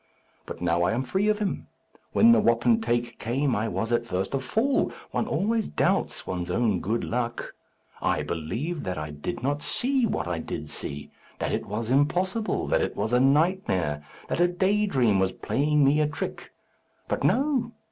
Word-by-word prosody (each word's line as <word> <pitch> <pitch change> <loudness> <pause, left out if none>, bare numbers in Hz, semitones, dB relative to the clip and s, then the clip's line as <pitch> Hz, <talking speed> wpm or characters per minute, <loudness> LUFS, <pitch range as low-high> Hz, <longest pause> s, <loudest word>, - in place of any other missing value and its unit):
But - - -7
now 85 0 +2
I 90 +5 +2
am 125 +3 0
free 190 +11 0
of 215 0 +3
him. 210 -2 -3 0.4
When 230 +1 +6
the 235 - +6
wapentake 120 - +1
came 130 +4 0
I 110 +2 0
was 115 +1 -2
at 120 0 +2
first 95 -2 -3
a 135 - +1
fool; 225 - +1 0.2
one - - -1
always 220 +1 0
doubts - - 0
one's 90 -1 -4
own 110 -6 +1
good 110 +6 -1
luck. 120 0 -3 0.5
I - - +1
believed 115 - -3
that 90 -2 -3
I 75 -1 -4
did 75 +9 -5
not 145 +2 0
see 255 - +1
what 205 - -2
I 85 -2 -2
did - - -6
see; 70 0 -5 0.3
that - - -2
it - - -2
was 110 +3 -3
impossible, 180 - +1
that - - +2
it - - -2
was 110 - -2
a 125 - +5
nightmare, 135 - +2 0.2
that - - -2
a 175 - +6
day 195 +4 +1
dream 120 - +2
was 95 0 +2
playing 150 +6 +1
me 145 +3 +4
a 150 - +2
trick. 150 - -5 0.6
But - - -2
no! 265 -4 +2
130 Hz, 185 wpm, -26 LUFS, -, 0.6 s, When